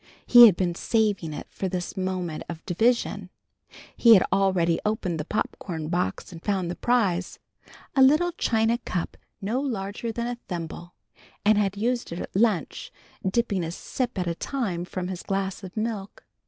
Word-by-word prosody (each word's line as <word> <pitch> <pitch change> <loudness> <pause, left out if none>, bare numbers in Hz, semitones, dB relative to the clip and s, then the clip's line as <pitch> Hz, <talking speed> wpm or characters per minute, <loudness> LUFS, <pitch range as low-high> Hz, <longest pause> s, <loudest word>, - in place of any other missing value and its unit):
He 240 -1 +10
had 200 - +4
been 175 -1 0
saving 205 -4 0
it 150 - -6
for 190 - -3
this 180 0 -4
moment 185 -4 -3
of 165 -1 -7
division. 230 +7 +1 0.7
He 230 -2 +7
had 190 - +5
already 185 -4 +2
opened 190 -6 -1
the 150 - -3
pop 210 - -2
corn 160 -4 -5
box 175 +1 -2
and 170 -1 -11
found 190 -4 -1
the - - -4
prize, 200 -8 0 0.6
a 270 - +4
little 305 +7 +5
china 230 -7 +1
cup 180 -7 -4 0.3
no 225 +6 0
larger 225 -3 -3
than 235 +1 -3
a 240 0 -4
thimble, 175 0 -6 0.5
and 215 +1 +6
had 200 -1 0
used 240 +1 -1
it 170 - -4
at - - -7
lunch, 205 -6 0 0.3
dipping 195 -1 0
a 165 - -3
sip 245 +7 -4
at 180 - 0
a 170 - -1
time 185 -4 -3
from 180 0 -4
his 185 -1 -5
glass 195 0 -2
of 190 +2 -9
milk. 215 -2 -4
195 Hz, 175 wpm, -26 LUFS, 175-230 Hz, 0.7 s, He